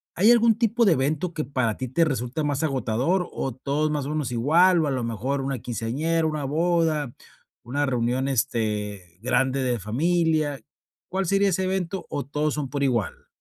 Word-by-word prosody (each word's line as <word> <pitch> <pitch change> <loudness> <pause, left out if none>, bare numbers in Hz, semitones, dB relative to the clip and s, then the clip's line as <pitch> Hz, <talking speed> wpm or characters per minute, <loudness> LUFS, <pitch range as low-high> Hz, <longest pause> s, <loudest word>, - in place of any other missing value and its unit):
¿hay 210 +7 +5
algún 230 -2 +4
tipo 235 0 +2
de 190 - +5
evento 155 +6 -1
que 155 - -2
para 125 -5 -1
ti 130 - -4
te 165 +7 +2
resulta 135 0 -2
más 145 0 -1
agotador, 135 - 0
o 135 - -3
todos 145 +4 -1
más 145 -2 -2
o 145 - -4
menos 150 -5 -2
igual, 165 +9 +4
o 150 - 0
a - - 0
lo 130 -3 -1
mejor, 120 +5 -2
una 135 -2 -3
quinceañera, 140 +9 -1
una 155 -2 -1
boda, 160 -3 +1 0.5
una 140 +5 -1
reunión, 125 0 0
este, 105 -8 -2
grande 130 +2 +1
de 125 -3 0
familia? 155 - +1 0.5
¿Cuál 190 +1 0
sería 195 +2 +3
ese 190 0 0
evento 190 0 -2
o 140 - -3
todos 150 +2 -1
son 145 -3 -3
por 140 0 -2
igual? 120 -8 -1
140 Hz, 185 wpm, -25 LUFS, 125-165 Hz, 0.5 s, hay